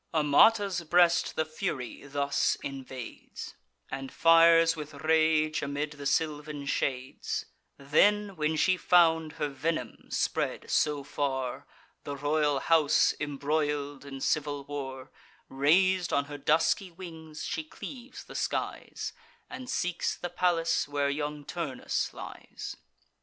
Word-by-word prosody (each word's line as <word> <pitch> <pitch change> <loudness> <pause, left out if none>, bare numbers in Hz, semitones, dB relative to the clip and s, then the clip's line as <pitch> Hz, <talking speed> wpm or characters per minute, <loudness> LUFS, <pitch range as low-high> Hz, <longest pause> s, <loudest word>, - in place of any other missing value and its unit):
Amata's 185 +6 +4
breast 175 +1 +3
the 160 - +1
Fury 155 -5 -4
thus 140 0 +1
invades, 130 -3 -7 0.4
And 135 0 -5
fires 165 0 +6
with 150 -1 -7
rage, 155 0 +2
amid 145 +1 -2
the 145 -2 -5
sylvan 150 -1 -1
shades; 130 -2 -2 0.3
Then, 200 +8 +3
when 155 -1 0
she 185 +4 +3
found 165 -3 +4
her 150 - -2
venom 140 -3 -3
spread - - -1
so 150 -2 +2
far, 130 -3 -3 0.4
The 140 - -5
royal 145 0 +1
house 160 -3 +4
embroil'd 145 -1 -1
in 135 -1 -8
civil 145 -1 0
war, 135 -2 -6 0.4
Rais'd 175 +6 +3
on 140 - +2
her 145 0 -7
dusky 160 +6 +2
wings, 165 -3 -9
she 320 - -2
cleaves 265 -4 -9
the - - -12
skies, - - -3 0.4
And 255 -1 -7
seeks 175 -1 -1
the 175 - -4
palace 175 -3 +1
where 145 -1 0
young 145 0 -4
Turnus 150 -7 -2
lies. - - -8
150 Hz, 120 wpm, -29 LUFS, 140-165 Hz, 0.4 s, fires